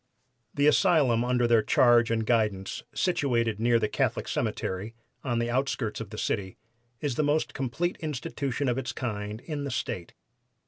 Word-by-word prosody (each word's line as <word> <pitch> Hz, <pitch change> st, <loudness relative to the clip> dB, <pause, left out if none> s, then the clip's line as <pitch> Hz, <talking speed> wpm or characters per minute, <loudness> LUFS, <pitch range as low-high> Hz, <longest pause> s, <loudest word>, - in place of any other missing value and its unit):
"The 145 Hz, -, +2 dB
asylum 150 Hz, -, +4 dB
under 125 Hz, 0 st, +2 dB
their 115 Hz, -1 st, +5 dB
charge 120 Hz, +2 st, +4 dB
and 115 Hz, -1 st, 0 dB
guidance, 105 Hz, -5 st, 0 dB
situated 120 Hz, -, 0 dB
near 120 Hz, +1 st, +4 dB
the 110 Hz, -2 st, +1 dB
Catholic -, -, -1 dB
Cemetery, 100 Hz, +5 st, -3 dB, 0.3 s
on 120 Hz, -3 st, -1 dB
the 120 Hz, 0 st, 0 dB
outskirts 125 Hz, -4 st, -1 dB
of 110 Hz, -, -7 dB
the 110 Hz, -, -8 dB
city, 95 Hz, -3 st, -2 dB, 0.4 s
is 140 Hz, -5 st, -2 dB
the 155 Hz, -, +2 dB
most 150 Hz, +2 st, +1 dB
complete 140 Hz, +7 st, -2 dB
institution 140 Hz, -2 st, -3 dB
of 125 Hz, +1 st, +1 dB
its 130 Hz, -, -4 dB
kind 105 Hz, -2 st, -4 dB
in 150 Hz, -1 st, -4 dB
the 140 Hz, -, -3 dB
State. 90 Hz, -8 st, -4 dB
120 Hz, 165 wpm, -28 LUFS, 110-140 Hz, 0.4 s, their